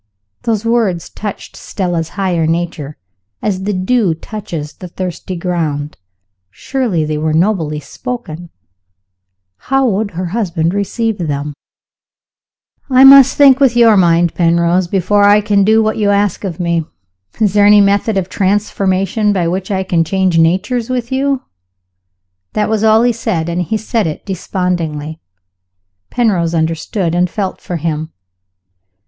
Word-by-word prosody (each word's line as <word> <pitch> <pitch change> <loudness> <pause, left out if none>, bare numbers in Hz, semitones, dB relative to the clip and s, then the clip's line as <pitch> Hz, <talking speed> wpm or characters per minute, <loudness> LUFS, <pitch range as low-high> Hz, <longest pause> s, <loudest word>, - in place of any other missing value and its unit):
(Those 225 -1 -2
words 225 -7 0
touched 205 -2 -7
Stella's 175 -4 -3
higher 180 -5 0
nature, 165 -3 -3 0.4
as 190 -2 -2
the 205 - -1
dew 185 -1 +1
touches 165 -6 -7
the 180 - -10
thirsty 185 +1 -6
ground. 160 -5 -3 0.5
Surely 210 - -2
they 150 0 -3
were 155 0 -1
nobly 160 -4 0
spoken! 175 - -7 1.2
How 270 0 +2
would 210 -1 -1
her 180 -1 -3
husband 170 -6 -1
receive 205 +2 -2
them?) 145 -3 -3 1.4
"I 260 0 +5
must 270 -1 +8
think 275 -2 +6
with 265 -4 +3
your 230 -2 +5
mind, 170 -2 +3
Penrose, 170 +1 +1
before 200 +3 +1
I 205 +1 +6
can 205 -1 +2
do 220 +2 +3
what 215 0 -1
you 210 -2 +1
ask 200 -1 0
of 185 -4 -5
me. 170 -2 0 0.6
Is 210 -4 +2
there 205 -1 +4
any 210 0 +7
method 200 +1 +2
of 185 -2 -1
transformation 195 +1 0
by 180 -4 0
which 185 +2 -3
I 190 -2 -1
can 175 -3 +1
change 185 0 +1
natures 190 +9 +1
with 250 -1 -3
you?" 270 0 0 1.1
That 210 0 0
was 220 -1 0
all 220 +1 +4
he 245 0 +2
said 210 -8 -2
and 170 +1 -1
he 215 +6 -1
said 220 -2 -1
it 155 - -6
despondingly. 165 -5 -3 0.9
Penrose 185 -9 0
understood, 165 +2 -1
and 180 +1 +1
felt 195 0 -4
for 175 - -4
him. 155 -1 -3
190 Hz, 145 wpm, -15 LUFS, 170-215 Hz, 1.4 s, must